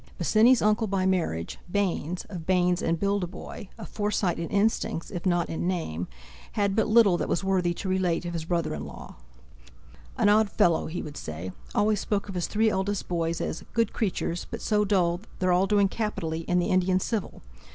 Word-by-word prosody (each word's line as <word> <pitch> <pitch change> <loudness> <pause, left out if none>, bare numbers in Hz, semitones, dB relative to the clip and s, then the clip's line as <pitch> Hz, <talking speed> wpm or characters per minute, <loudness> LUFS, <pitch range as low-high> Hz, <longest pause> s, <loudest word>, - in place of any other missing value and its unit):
Bosinney's 230 +3 +4
uncle 215 +1 +2
by 190 -1 0
marriage, 165 - -1
Baynes, 180 -4 -1
of 175 -5 -8
Baynes 180 -1 +2
and 165 0 0
Bildeboy, 200 -1 -3
a 220 - -7
Forsyte 205 -2 -1
in 165 - -3
instincts 205 -5 0
if 175 +2 -3
not 175 -2 +2
in 165 +2 -3
name, 90 - -2 0.5
had 200 -3 +1
but 220 -1 +2
little 215 -5 +5
that - - -3
was 175 - 0
worthy 185 -2 +1
to 195 - -5
relate 185 -2 0
of 175 - -4
his 165 -2 -3
brother 170 -1 -1
in 75 - -5
law. - - -10 1.0
"An - - +3
odd 210 0 +4
fellow!" 170 -3 +2
he 170 +3 -4
would 150 -1 -8
say: 80 +4 -6 0.2
"always 210 0 +3
spoke 205 0 -1
of 200 - -6
his 180 -2 -1
three 220 +1 +2
eldest 200 +1 -1
boys 165 -1 -1
as - - -3
'good 230 -2 +1
creatures, 180 -5 -2
but 230 - -5
so 210 -1 +2
dull'; 180 -3 +1 0.2
they're 185 -1 +1
all 185 +2 +3
doing 205 -1 +4
capitally 195 -7 -3
in 180 - +2
the 175 - +1
Indian 185 0 +3
Civil! 210 - -3
185 Hz, 195 wpm, -27 LUFS, 170-205 Hz, 1.0 s, little